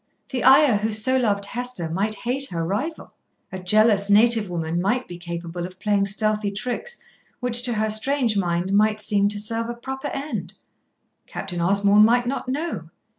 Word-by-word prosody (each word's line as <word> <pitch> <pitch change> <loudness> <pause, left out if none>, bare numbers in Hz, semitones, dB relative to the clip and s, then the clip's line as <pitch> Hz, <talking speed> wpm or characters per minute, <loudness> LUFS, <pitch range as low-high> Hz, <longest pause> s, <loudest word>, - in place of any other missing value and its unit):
The 250 - -3
Ayah 265 -3 +6
who 215 +2 -2
so 215 +5 +3
loved 205 -6 0
Hester 245 -5 -3
might 195 +6 -1
hate 255 +5 -1
her 165 -2 -3
rival. 260 - -4 0.4
A 190 - -6
jealous 205 +2 +3
native 220 0 +4
woman 170 0 -2
might 245 +7 -1
be 175 - -8
capable 170 0 -6
of 185 0 -17
playing 200 0 +1
stealthy 210 +1 +1
tricks, 250 - -4 0.4
which, 245 -1 +2
to 245 -1 0
her 215 0 -1
strange 240 +1 +1
mind, 180 0 -1
might 215 +1 +2
seem 205 -2 +2
to 205 - -2
serve 230 +2 -3
a 240 - -4
proper 265 +3 -6
end. 285 +2 -5 0.7
Captain 175 -3 -5
Osborn 200 +3 +4
might 240 +2 +3
not 260 0 -3
know. 275 - -4
215 Hz, 175 wpm, -22 LUFS, 195-245 Hz, 0.7 s, Ayah